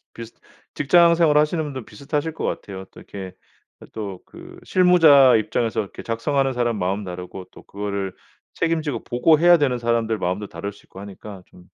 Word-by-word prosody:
비슷 115 Hz, 0 st, -10 dB, 0.4 s
직장 170 Hz, +3 st, +4 dB
생활 165 Hz, -3 st, +3 dB
하시는 155 Hz, +2 st, +1 dB
분들 135 Hz, -5 st, -6 dB
비슷하실 145 Hz, +8 st, -4 dB
것 -, -, -6 dB
같아요. 95 Hz, -1 st, -5 dB
또 -, -, -16 dB
이렇게 95 Hz, -2 st, -8 dB, 0.5 s
이 -, -, -11 dB
또 100 Hz, -4 st, -6 dB
그 -, -, -14 dB
실무자 160 Hz, -8 st, +6 dB
입장에서 110 Hz, +1 st, -1 dB
이렇게 100 Hz, -, -8 dB
작성하는 135 Hz, +4 st, -1 dB
사람 120 Hz, -2 st, -1 dB
마음 95 Hz, +3 st, -2 dB
다르고 90 Hz, +1 st, -8 dB
또 -, -, -14 dB
그거를 100 Hz, -1 st, -4 dB, 0.4 s
책임지고 160 Hz, -4 st, -2 dB
보고해야 160 Hz, +7 st, +4 dB
되는 130 Hz, -5 st, +1 dB
사람들 115 Hz, -2 st, 0 dB
마음도 95 Hz, +3 st, -2 dB
다를 100 Hz, 0 st, -6 dB
수 100 Hz, -, -20 dB
있고 -, -, -15 dB
하니까 100 Hz, -1 st, -10 dB
좀 90 Hz, -, -18 dB
115 Hz, 390 characters per minute, -22 LUFS, 100-150 Hz, 0.5 s, 실무자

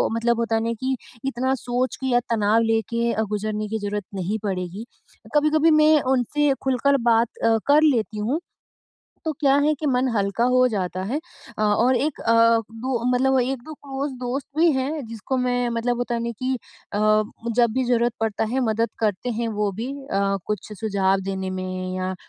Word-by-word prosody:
मतलब 235 Hz, 0 st, +1 dB
होता 230 Hz, -1 st, 0 dB
है 225 Hz, -, +1 dB
ना 230 Hz, 0 st, -1 dB
कि 260 Hz, 0 st, 0 dB, 0.3 s
इतना 260 Hz, 0 st, 0 dB
सोच 250 Hz, +1 st, -2 dB
के 265 Hz, -, -4 dB
या 245 Hz, -1 st, +3 dB
तनाव 220 Hz, 0 st, +3 dB
लेके 230 Hz, +1 st, 0 dB
अ, -, -, 0 dB
गुज़रने 215 Hz, 0 st, -2 dB
की 220 Hz, +1 st, -3 dB
ज़रूरत 205 Hz, 0 st, -3 dB
नहीं 195 Hz, +3 st, -2 dB
पड़ेगी। 190 Hz, +1 st, -3 dB, 0.5 s
कभी-कभी 305 Hz, +2 st, +4 dB
मैं 305 Hz, 0 st, +5 dB
उनसे 275 Hz, +3 st, +2 dB
खुलकर 270 Hz, +2 st, +2 dB
बात 230 Hz, +1 st, +4 dB, 0.2 s
अ, 225 Hz, 0 st, +4 dB
कर 290 Hz, +2 st, +6 dB
लेती 230 Hz, -7 st, +2 dB
हूँ, 235 Hz, +9 st, -1 dB, 0.9 s
तो 315 Hz, -, 0 dB
क्या 275 Hz, -2 st, +4 dB
है 305 Hz, -, +3 dB
कि 310 Hz, -, -3 dB
मन 255 Hz, -1 st, +2 dB
हल्का 200 Hz, +3 st, 0 dB
हो 255 Hz, 0 st, +5 dB
जाता 185 Hz, -5 st, -2 dB
है। 245 Hz, +10 st, -2 dB, 0.4 s
अ, 215 Hz, -, 0 dB
और 225 Hz, +5 st, +3 dB
एक 285 Hz, +4 st, -1 dB
अ, 230 Hz, -, +2 dB, 0.4 s
दो 235 Hz, +1 st, -3 dB
मतलब 265 Hz, +1 st, +3 dB
1-2 265 Hz, +4 st, -4 dB
क्लोज़ 280 Hz, -1 st, -5 dB
दोस्त 255 Hz, +2 st, -3 dB
भी 330 Hz, +1 st, +5 dB
हैं 275 Hz, +1 st, -2 dB
जिसको 230 Hz, +4 st, -3 dB
मैं 245 Hz, -1 st, 0 dB
मतलब 235 Hz, +1 st, -1 dB
होता 245 Hz, 0 st, -2 dB
है -, -, -1 dB
ना 235 Hz, -, -2 dB
कि 255 Hz, +1 st, 0 dB, 0.4 s
अ, 205 Hz, -, 0 dB, 0.6 s
जब 235 Hz, -2 st, +4 dB
भी 260 Hz, -, +1 dB
जरूरत 240 Hz, -1 st, +2 dB
पड़ता 225 Hz, -1 st, 0 dB
है 265 Hz, -, +1 dB
मदद 225 Hz, +1 st, 0 dB
करते 215 Hz, +1 st, -1 dB
हैं 235 Hz, -, 0 dB
वो 210 Hz, -1 st, +1 dB
भी 225 Hz, +7 st, -5 dB, 0.2 s
अ, 195 Hz, -2 st, 0 dB
कुछ 210 Hz, 0 st, -4 dB
सुझाव 195 Hz, -3 st, +1 dB
देने 190 Hz, -1 st, -3 dB
में 185 Hz, 0 st, -4 dB
या 185 Hz, 0 st, -2 dB
235 Hz, 190 wpm, -23 LUFS, 210-265 Hz, 0.9 s, कर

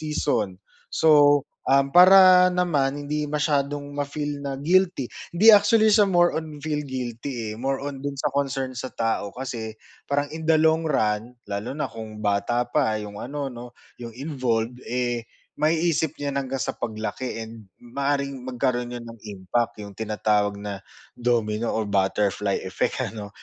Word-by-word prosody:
season. 150 Hz, -11 st, -1 dB, 0.3 s
So, 145 Hz, -3 st, +5 dB, 0.2 s
um, 135 Hz, 0 st, +3 dB
para 185 Hz, 0 st, +8 dB
naman 155 Hz, -7 st, +1 dB
hindi 150 Hz, +1 st, -2 dB
masyadong 145 Hz, -1 st, -1 dB
ma-feel 145 Hz, 0 st, -3 dB
na 140 Hz, -1 st, -4 dB
guilty, 175 Hz, -2 st, +2 dB, 0.3 s
’di 220 Hz, +5 st, +8 dB
actually 215 Hz, +1 st, +5 dB
siya 205 Hz, -2 st, +5 dB
more 175 Hz, -2 st, +4 dB
on 155 Hz, -2 st, -5 dB
feel 150 Hz, -1 st, -1 dB
guilty 120 Hz, -3 st, -5 dB
eh, -, -, -6 dB
more 135 Hz, +1 st, 0 dB
on 140 Hz, -2 st, -5 dB
do’n 140 Hz, 0 st, -4 dB
sa 135 Hz, -, -2 dB
concern 135 Hz, -2 st, -1 dB
sa 130 Hz, +1 st, -5 dB
tao 115 Hz, -3 st, -2 dB
kasi, 115 Hz, -4 st, -5 dB, 0.3 s
parang 145 Hz, 0 st, +1 dB
in 160 Hz, 0 st, -6 dB
the 160 Hz, -, +6 dB
long 160 Hz, +1 st, +3 dB
run, 110 Hz, -2 st, 0 dB
lalo 100 Hz, +3 st, -4 dB
na 150 Hz, -, -1 dB
kung 110 Hz, -1 st, -9 dB
bata 105 Hz, +4 st, +1 dB
pa 120 Hz, -3 st, +1 dB
’yong 105 Hz, -1 st, -7 dB
ano, 140 Hz, +1 st, -4 dB
'no, 120 Hz, 0 st, -10 dB, 0.2 s
’yong 115 Hz, -1 st, -8 dB
involved, 125 Hz, -4 st, -2 dB
eh, 120 Hz, -1 st, -2 dB, 0.3 s
maiisip 160 Hz, -1 st, +1 dB
niya 145 Hz, -1 st, -3 dB
na 140 Hz, -, 0 dB
hanggang 130 Hz, -2 st, -3 dB
sa -, -, -2 dB
paglaki 110 Hz, +3 st, -4 dB
and 110 Hz, -3 st, -12 dB, 0.2 s
maaaring 140 Hz, +3 st, -1 dB, 0.2 s
magkaroon 125 Hz, -1 st, -1 dB
’yon 120 Hz, -, -8 dB
ng 115 Hz, -1 st, -11 dB
impact, 105 Hz, +5 st, -2 dB
’yong 100 Hz, -, -10 dB
tinatawag 105 Hz, -1 st, 0 dB
na 100 Hz, -1 st, -6 dB, 0.3 s
domino 115 Hz, -2 st, 0 dB
or 110 Hz, -, -1 dB
butterfly 100 Hz, 0 st, 0 dB
effect -, -, -1 dB
ano? 105 Hz, -2 st, -6 dB
130 Hz, 160 wpm, -24 LUFS, 115-150 Hz, 0.3 s, para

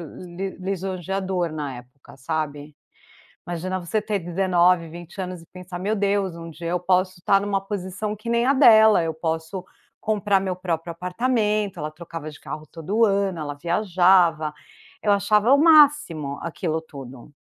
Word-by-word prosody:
li 180 Hz, +4 st, -7 dB
lisonjeador 190 Hz, -1 st, -3 dB
na 145 Hz, -4 st, -4 dB
época, 125 Hz, +3 st, -15 dB
sabe. 150 Hz, +1 st, -4 dB, 0.7 s
Imagina 180 Hz, +2 st, -3 dB
você 185 Hz, +4 st, -1 dB
ter 210 Hz, -1 st, -1 dB
19, 175 Hz, -1 st, +2 dB
20 175 Hz, +4 st, -9 dB
anos 180 Hz, -1 st, -5 dB
e 165 Hz, -, -18 dB
pensar: 180 Hz, -1 st, -8 dB
"Meu 205 Hz, +4 st, -1 dB
Deus, 200 Hz, -3 st, 0 dB
um 165 Hz, 0 st, -8 dB
dia 165 Hz, +1 st, -7 dB
eu 180 Hz, -, 0 dB
posso 185 Hz, +1 st, +2 dB
estar 195 Hz, +2 st, +2 dB
em -, -, -3 dB
uma 195 Hz, -1 st, 0 dB
posição 195 Hz, +1 st, -4 dB
que 215 Hz, +3 st, -9 dB
nem 235 Hz, +1 st, +2 dB
a 275 Hz, -, +4 dB
dela, 220 Hz, -, +7 dB
eu 160 Hz, -, -1 dB
posso 160 Hz, +3 st, -3 dB, 0.4 s
comprar 210 Hz, -2 st, +1 dB
meu 185 Hz, -1 st, -3 dB
próprio 170 Hz, -2 st, -3 dB
apartamento", 210 Hz, +2 st, -1 dB
ela 150 Hz, -1 st, -4 dB
trocava 165 Hz, -1 st, -8 dB
de 150 Hz, -, -14 dB
carro 155 Hz, 0 st, -7 dB
todo 185 Hz, +9 st, 0 dB
ano, 195 Hz, -3 st, +1 dB
ela 145 Hz, -2 st, -4 dB
viajava. 175 Hz, -1 st, +3 dB, 0.5 s
Eu 205 Hz, -, +3 dB
achava 210 Hz, +4 st, +3 dB
o 280 Hz, -, +6 dB
máximo 290 Hz, -, +4 dB
aquilo 165 Hz, -1 st, -2 dB
tudo. 135 Hz, -5 st, -11 dB
180 Hz, 160 wpm, -23 LUFS, 165-200 Hz, 0.7 s, dela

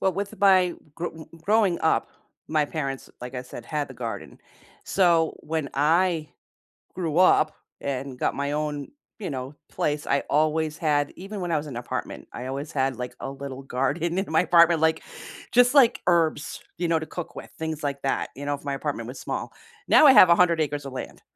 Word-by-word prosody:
Well, 190 Hz, -, +2 dB
with 200 Hz, +2 st, -5 dB
my 185 Hz, -3 st, +5 dB, 0.2 s
gro 165 Hz, -1 st, -6 dB, 0.2 s
growing 205 Hz, -3 st, +3 dB
up, 160 Hz, -, +2 dB, 0.4 s
my 155 Hz, -1 st, +2 dB
parents, 140 Hz, -3 st, -4 dB
like 125 Hz, +1 st, -7 dB
I 125 Hz, -, -4 dB
said, 125 Hz, -, -10 dB
had 150 Hz, -2 st, -3 dB
the 130 Hz, -, -10 dB
garden. 115 Hz, -5 st, -6 dB, 0.5 s
So, 170 Hz, -4 st, +3 dB
when 155 Hz, -2 st, -3 dB
I 160 Hz, +2 st, +2 dB, 0.7 s
grew 165 Hz, -4 st, -2 dB
up 160 Hz, -4 st, +5 dB, 0.3 s
and 135 Hz, -1 st, -4 dB
got -, -, 0 dB
my 140 Hz, +1 st, -2 dB
own, 150 Hz, -1 st, -3 dB, 0.3 s
you 195 Hz, -, -4 dB
know, 130 Hz, 0 st, -5 dB
place, 150 Hz, 0 st, -2 dB
I 140 Hz, -, +2 dB
always 155 Hz, +1 st, +1 dB
had 145 Hz, -2 st, +1 dB
even 195 Hz, +2 st, -7 dB
when 175 Hz, -1 st, -2 dB
I 160 Hz, -, +2 dB
was 150 Hz, +1 st, -4 dB
in 135 Hz, -, -7 dB
apartment, 120 Hz, -, -5 dB
I 125 Hz, -, -6 dB
always 140 Hz, +3 st, -5 dB
had, 135 Hz, -1 st, 0 dB
like, 125 Hz, 0 st, -5 dB
a -, -, -5 dB
little 135 Hz, -1 st, -7 dB
garden 145 Hz, +7 st, -1 dB
in 195 Hz, -, 0 dB
my 160 Hz, -, +4 dB
apartment. 170 Hz, -2 st, +5 dB
Like, 160 Hz, 0 st, +2 dB, 0.5 s
just 245 Hz, +1 st, +5 dB
like 255 Hz, -5 st, +5 dB
herbs, 165 Hz, -4 st, +1 dB, 0.2 s
you 175 Hz, 0 st, -1 dB
know, 165 Hz, -1 st, +2 dB
to 160 Hz, -, -5 dB
cook 175 Hz, +1 st, -7 dB
with, -, -, -9 dB
things 160 Hz, -1 st, -4 dB
like 140 Hz, -1 st, -2 dB
that, 135 Hz, -, -1 dB
you 145 Hz, -, -7 dB
know, 145 Hz, -, 0 dB
if 140 Hz, -, -14 dB
my 140 Hz, -, -2 dB
apartment 135 Hz, -5 st, -4 dB
was 125 Hz, -, -8 dB
small. -, -, -4 dB, 0.4 s
Now, -, -, +7 dB
I 270 Hz, -, +9 dB
have 185 Hz, -, +9 dB
100 170 Hz, -1 st, +4 dB
acres 145 Hz, -1 st, -2 dB
of 135 Hz, -, -7 dB
land, 130 Hz, -, -7 dB
155 Hz, 200 wpm, -25 LUFS, 140-170 Hz, 0.7 s, I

